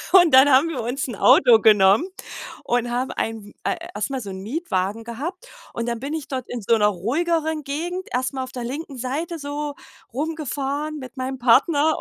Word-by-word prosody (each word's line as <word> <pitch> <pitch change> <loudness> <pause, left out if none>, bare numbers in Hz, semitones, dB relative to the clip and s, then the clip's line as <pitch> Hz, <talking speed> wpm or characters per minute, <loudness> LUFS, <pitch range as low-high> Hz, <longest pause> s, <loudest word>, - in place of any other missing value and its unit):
Und 350 -5 +7
dann 265 +2 +8
haben 280 +4 +5
wir 280 -7 -3
uns 250 +5 -3
'n 240 - -5
Auto 245 +1 +6
genommen 210 - +5 0.6
und 245 0 0
haben 250 +2 -2
ein 220 -2 -4
äh, - - 0 0.2
erst 210 +6 -2
mal 265 -1 -2
so 200 -4 -7
'n 190 - -7
Mietwagen 220 - -2
gehabt 310 - -6 0.3
und 235 - -3
dann 235 -1 -2
bin 280 +4 -4
ich 315 -3 -4
dort 260 -2 -4
in 245 - -4
so 230 - +4
'ner 210 - +3
ruhigeren 310 - -1
Gegend 345 +7 -4
erst 255 +1 0
mal 265 - -2
auf 255 - -9
der 245 -2 -5
linken 280 +3 -6
Seite 300 +7 -3
so 290 0 -4 0.4
rumgefahren 295 +1 -3
mit 260 +1 -10
meinem 260 +1 -4
Partner. 285 +5 +4
265 Hz, 195 wpm, -22 LUFS, 235-305 Hz, 0.6 s, dann